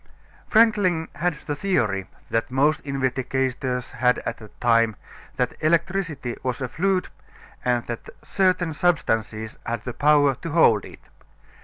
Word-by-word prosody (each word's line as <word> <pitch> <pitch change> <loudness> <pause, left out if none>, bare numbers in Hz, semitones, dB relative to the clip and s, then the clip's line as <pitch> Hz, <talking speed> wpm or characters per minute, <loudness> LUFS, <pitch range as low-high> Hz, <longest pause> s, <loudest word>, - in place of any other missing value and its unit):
Franklin 205 -7 +3
had 175 -2 -1
the 145 - -2
theory 110 - 0 0.2
that 115 0 0
most 140 +4 +2
investigators 130 -1 -2
had 125 -1 +2
at - - -3
that 110 -3 -15
time, 115 -2 +3 0.4
that - - 0
electricity 165 -5 0
was 130 -2 -2
a 130 - -2
fluid 185 +8 0 0.5
and 120 -1 +1
that 120 -1 -6
certain 185 -4 +1
substances 110 - 0
had 115 -1 -3
the 125 - -5
power 145 0 +4
to 140 +6 -7
hold 130 - +4
it. - - -13
135 Hz, 135 wpm, -24 LUFS, 120-170 Hz, 0.5 s, power